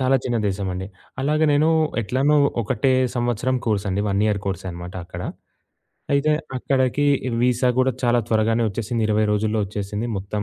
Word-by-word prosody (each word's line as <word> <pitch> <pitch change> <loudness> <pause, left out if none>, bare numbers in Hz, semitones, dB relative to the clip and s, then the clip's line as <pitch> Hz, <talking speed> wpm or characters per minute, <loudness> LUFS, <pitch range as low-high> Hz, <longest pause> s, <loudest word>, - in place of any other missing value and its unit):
చాలా 130 +1 +3
చిన్న 120 -2 0
దేశమండి. 95 -1 -3 0.3
అలాగే 150 +3 +2
నేనూ 155 +3 +3 0.3
ఎట్లనో 135 +8 +2 0.3
ఒకటే 130 +5 +1 0.2
సంవత్సరం 120 +2 0
కోర్సండి. 100 -2 0
1 100 +1 +1
ఇయర్ 105 -2 0
కోర్సే 95 -1 -3
అనమాట 85 +1 -8
అక్కడ. 90 0 -8 0.9
అయితే 145 +2 +3 0.2
అక్కడికి, 130 +2 +1 0.4
వీసా 125 0 +2
గూడా 130 0 +3
చాలా 120 0 +3
త్వరగానే 115 +1 +2
ఒచ్చేసింది. 115 +2 -2
20 105 0 +2
రోజుల్లో 110 +1 0
ఒచ్చేసింది 105 +3 -4
మొత్తం 105 +2 -4
110 Hz, 145 wpm, -22 LUFS, 100-130 Hz, 0.9 s, చాలా